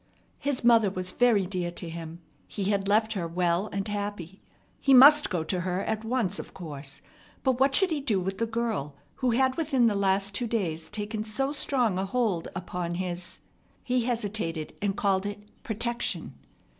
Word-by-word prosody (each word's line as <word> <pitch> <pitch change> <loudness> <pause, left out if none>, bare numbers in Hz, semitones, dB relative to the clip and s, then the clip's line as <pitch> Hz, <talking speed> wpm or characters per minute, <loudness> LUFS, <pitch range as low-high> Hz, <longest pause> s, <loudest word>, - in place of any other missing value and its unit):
His 280 -3 -1
mother 230 -3 +5
was 185 -1 -3
very 230 -5 +3
dear 180 -2 -2
to 175 - -7
him. 165 0 -7 0.3
He 200 -1 -2
had 200 -1 0
left 220 +2 +3
her 180 -5 -2
well 175 +3 0
and 195 +1 -3
happy. 205 -3 -5 0.4
He 270 -1 +5
must 295 +4 +8
go 175 -5 -1
to 180 +3 -2
her 180 +1 -1
at 220 +1 -2
once, 225 -5 -1
of - - -9
course; 145 -6 -8 0.4
but 260 -2 +1
what 270 0 +3
should 380 +1 +3
he 300 -3 -1
do 225 -8 +1
with 190 +2 -3
the 230 - 0
girl 225 -11 -2 0.2
who 255 - +1
had 260 +2 +2
within 280 -7 +2
the 225 - +3
last 195 0 +1
two 235 +4 -1
days 170 -8 -2
taken 210 +1 -4
so 245 +6 -1
strong 250 -8 +1
a 190 - -1
hold 200 -5 0
upon 175 -1 -4
his 180 0 -4 0.4
he 250 0 +1
hesitated, 205 -9 -2
and 200 -1 -1
called 195 -1 +1
it 205 0 -6 0.2
"protection." 235 -1 -2
205 Hz, 180 wpm, -27 LUFS, 180-235 Hz, 0.4 s, must